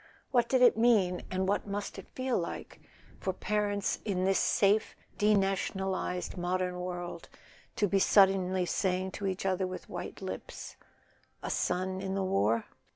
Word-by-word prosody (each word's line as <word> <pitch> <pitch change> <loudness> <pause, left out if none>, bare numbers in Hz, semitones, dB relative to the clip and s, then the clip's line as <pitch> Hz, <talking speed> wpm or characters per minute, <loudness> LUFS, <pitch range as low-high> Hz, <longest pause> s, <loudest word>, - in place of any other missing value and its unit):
What 245 -3 +3
did 260 -1 +4
it 245 - +7
mean, 210 -6 +3
and 185 0 -1
what 205 +1 0
must 200 0 -4
it 195 - -11
feel 260 -1 -1
like, 170 - -6 0.4
for 190 - -2
parents 205 0 -1
in 185 -3 -1
this 195 0 +3
safe 205 +2 +2 0.2
denationalized 195 -3 0
modern 180 0 -1
world 175 -1 -5 0.5
to 205 - +2
be 195 +1 +2
suddenly 190 -2 +4
saying 185 +1 0
to 200 +1 -4
each 190 0 -3
other 190 0 +1
with 185 0 -8
white - - -6
lips: - - -7 0.7
A - - -2
son 185 +1 -1
in 190 0 -3
the 195 - 0
war 115 - +1
190 Hz, 155 wpm, -31 LUFS, 180-205 Hz, 0.7 s, it